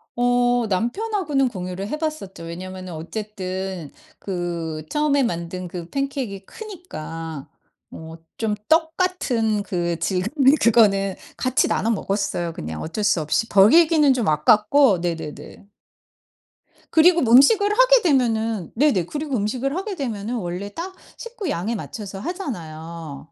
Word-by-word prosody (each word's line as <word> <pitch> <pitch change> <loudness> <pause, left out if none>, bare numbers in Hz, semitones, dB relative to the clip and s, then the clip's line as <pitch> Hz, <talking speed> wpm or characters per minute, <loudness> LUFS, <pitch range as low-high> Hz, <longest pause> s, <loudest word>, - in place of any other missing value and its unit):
어 245 0 +2
남편하고는 275 - 0
공유를 185 -2 -5
해 300 - -2
봤었죠. 305 - -5
왜냐하면은 185 +2 -7
어쨌든 185 -1 -5 0.3
그 170 -4 -4
처음에 295 -2 +2
만든 180 -4 -3
그 175 -1 -7
팬케익이 270 -8 -3
크니까 165 - -8 0.4
어 160 0 -9 0.2
좀 220 -2 0
떡 320 0 +3
같은 235 - 0
그 175 -4 -2
질감의 220 - +2
그거는 195 -4 +4 0.2
같이 255 0 +1
나눠 225 - 0
먹었어요. 195 -5 -2
그냥 80 - -6
어쩔 210 +7 -4
수 205 -4 +3
없이 155 +9 0
버리기는 300 - +6
좀 245 -4 -1
아깝고 210 - +4
네네네. 170 +2 -6 1.3
그리고 340 +2 +5
뭐 230 -2 +2
음식을 405 - +6
하게 - - +5
되면은 225 - +1
네네 230 - +2
그리고 295 +1 -3
음식을 250 +7 -1
하게 390 +2 -3
되면은 235 - -3
원래 185 -1 -4
딱 370 +3 -6 0.2
식구 450 -7 -6
양에 215 +2 -2
맞춰서 200 -2 -7
하잖아요. 165 - -7
215 Hz, 290 characters per minute, -22 LUFS, 180-280 Hz, 1.3 s, 버리기는